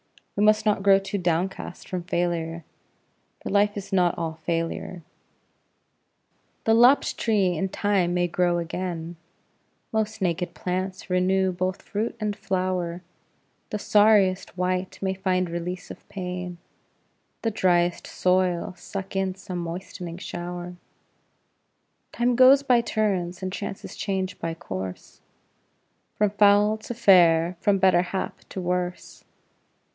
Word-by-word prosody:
We 205 - +1
must 215 +1 +4
not 210 -2 +2
grow 195 0 +6
too 195 +1 -3
downcast 175 +1 -2
from 185 -1 -3
failure, 170 -1 -2 0.8
for - - -6
life 205 +1 +2
is 195 0 -7
not 180 -2 +3
all 160 -1 -4
failure. 165 +1 -3 1.6
The 225 - +3
lopped 245 +5 +5
tree 200 -6 +2
in 190 +4 -1
time 185 -3 +1
may 175 0 +2
grow 175 0 +1
again, 170 0 -4 0.7
Most 220 -1 -1
naked 180 -2 -1
plants 185 +1 -4
renew 185 +1 +2
both 185 +1 -3
fruit 215 +3 -3
and 210 -1 -2
flower; 180 -2 -2 0.7
The 210 - -2
sorriest 205 -3 +3
wight 185 +1 -1
may 190 0 +1
find 185 -1 0
release 175 +2 -5
of - - -13
pain, 180 -2 -5 0.9
The 225 - +1
driest 175 -3 +1
soil 180 -1 +1
suck 195 +2 -7
in 190 -1 0
some 185 -2 -6
moistening 170 0 -6
shower; 175 0 -6 1.3
Time 240 0 +1
goes 260 +3 +7
by 250 -4 +4
turns, 195 -6 -1
and 185 0 -3
chances 200 -1 -6
change 190 -2 -3
by 165 -1 -3
course, 95 - -7 0.9
From 210 -1 +2
foul 205 +1 +4
to 225 +2 -7
fair, 175 -5 +5
from 205 -1 +3
better 190 -2 +4
hap 180 +1 -4
to - - -6
worse. 180 0 -3
185 Hz, 130 wpm, -25 LUFS, 175-200 Hz, 1.6 s, goes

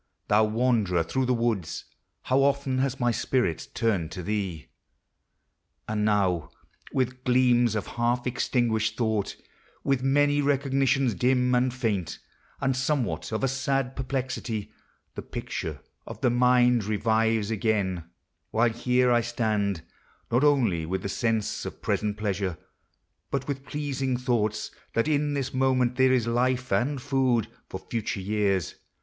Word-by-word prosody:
thou 105 +1 +5
wanderer 110 -6 +2
through 130 +10 -1
the 125 - +3
woods, 115 -7 -1 0.4
How 130 +1 +2
often 140 -1 +1
has 135 0 0
my 120 -1 +2
spirit 120 - 0
turned 95 -8 0
to 90 - -6
thee! 95 -5 -3 1.2
And 105 -1 -1
now, 95 -8 +1 0.4
with 130 -1 -1
gleams 125 -2 +3
of 105 - -2
half 120 +1 -1
extinguished 115 -3 0
thought, 110 -4 0 0.5
With 135 -2 +1
many 145 +2 +3
recognitions 135 -2 +2
dim 125 +2 +2
and 125 +1 +3
faint, 105 -10 -2 0.4
And 135 -1 +1
somewhat 130 -2 -1
of 110 +4 -2
a - - +4
sad 135 0 -1
perplexity, 125 -5 -3 0.4
The - - -6
picture - - -5 0.3
of - - -8
the 125 - +3
mind 125 -2 +4
revives 110 0 +1
again: 100 -6 0 0.4
While 115 +1 +2
here 125 +1 +2
1 120 0 +4
stand, 105 -6 -1 0.5
not 125 +4 +3
only 120 - +3
with 90 +3 -3
the 100 - -2
sense 110 0 -1
Of - - -7
present 105 0 0
pleasure, 100 -4 -2 0.7
bu1 135 -1 -2
will' 135 -2 -5
pleasing 135 -3 -1
thoughts 115 -4 -1 0.2
That 115 - +1
in 145 -1 +1
this 135 -2 -2
moment 130 -1 +2
there 130 0 +5
is 125 -3 +2
life 125 +2 0
and 135 +3 +1
food 130 -4 +1 0.2
For - - -4
future 110 -3 -3
years. 100 -4 0
120 Hz, 140 wpm, -27 LUFS, 105-130 Hz, 1.2 s, thou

